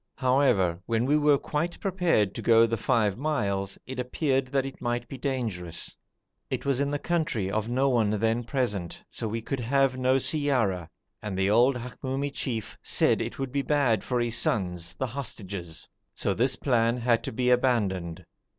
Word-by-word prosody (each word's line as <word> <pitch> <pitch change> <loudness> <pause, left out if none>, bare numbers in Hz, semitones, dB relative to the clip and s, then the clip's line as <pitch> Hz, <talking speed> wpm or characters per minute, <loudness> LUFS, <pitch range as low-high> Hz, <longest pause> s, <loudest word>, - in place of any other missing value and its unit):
However, 125 -10 +2
when 115 +1 +1
we 145 +3 +3
were 150 -1 +4
quite 155 +5 -3
prepared 175 - +1
to - - -5
go 115 -1 +6
the 115 0 -1
five 110 -2 +1
miles, 100 -10 -1
it 130 0 -6
appeared 130 +1 0
that 135 +1 0
it 135 - -8
might 120 0 -2
be - - -7
dangerous. 115 - -3 0.5
It - - -3
was 135 -2 +1
in 140 0 +1
the 145 - -1
country 150 - -1
of 110 +2 -1
no 130 +3 +2
one 120 -5 +2
then 110 +3 +1
present, 110 -8 -2
so 115 - -3
we 115 +1 -3
could 135 +3 -3
have 130 +2 +1
no 130 +1 +3
siyara, 125 - +1 0.3
and 100 -3 -4
the 95 +1 +2
old 125 +5 +5
Hamoumi 130 +3 -4
chief 115 -7 -4
said - - +2
it - - -4
would 135 -1 -3
be 140 +1 0
bad 135 -7 +2
for 125 -1 -1
his 120 -1 0
sons, 90 -4 -1
the 130 - -2
hostages; 100 - -6 0.3
so 100 - 0
this 125 +5 +2
plan 120 -3 +1
had 120 -1 +2
to - - -3
be 125 +2 +1
abandoned. 100 -10 +1
120 Hz, 180 wpm, -27 LUFS, 105-135 Hz, 0.5 s, go